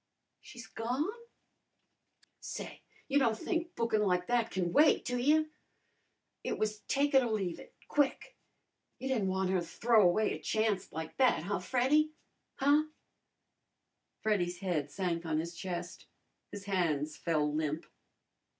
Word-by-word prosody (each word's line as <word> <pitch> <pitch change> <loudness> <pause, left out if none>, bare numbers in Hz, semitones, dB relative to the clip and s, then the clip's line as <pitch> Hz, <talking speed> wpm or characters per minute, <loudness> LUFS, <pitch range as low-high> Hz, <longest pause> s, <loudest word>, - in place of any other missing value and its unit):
"She's 240 -3 -11
gone?" 250 - -2 1.3
"Say, - - -7 0.3
you 285 0 +3
don' 230 -5 +2
think 335 - -3
bookin' 230 -2 +1
like 180 -3 +1
that 235 0 +1
can 175 -2 -2
wait, 300 +1 +5
do 245 0 -1
you? 310 +4 +3 0.9
It - - -2
was 215 0 -1
take 285 +1 +1
it 270 - +7
or 240 - -1
leave 195 -6 -2
it - - -14
quick. 290 - 0 0.6
You 265 - -5
didn't 225 -7 +1
wan' 190 0 0
her 190 -1 +2
to - - -3
throw 225 +5 +3
away 205 +3 +3
a - - -6
chancet 215 -3 0
like 160 0 -6
that, 255 -11 +3
huh, 200 +2 -1
Freddy? 270 +9 +2 0.4
Huh?" 290 +3 +3 1.4
Freddy's 180 -5 +1
head 170 -6 -2
sank 175 -1 -2
on 160 -2 -1
his 170 +2 -3
chest. 180 0 -6 0.4
His 200 -1 -8
hands 155 -6 0
fell 150 -3 0
limp. 155 0 -2
210 Hz, 145 wpm, -32 LUFS, 175-255 Hz, 1.4 s, it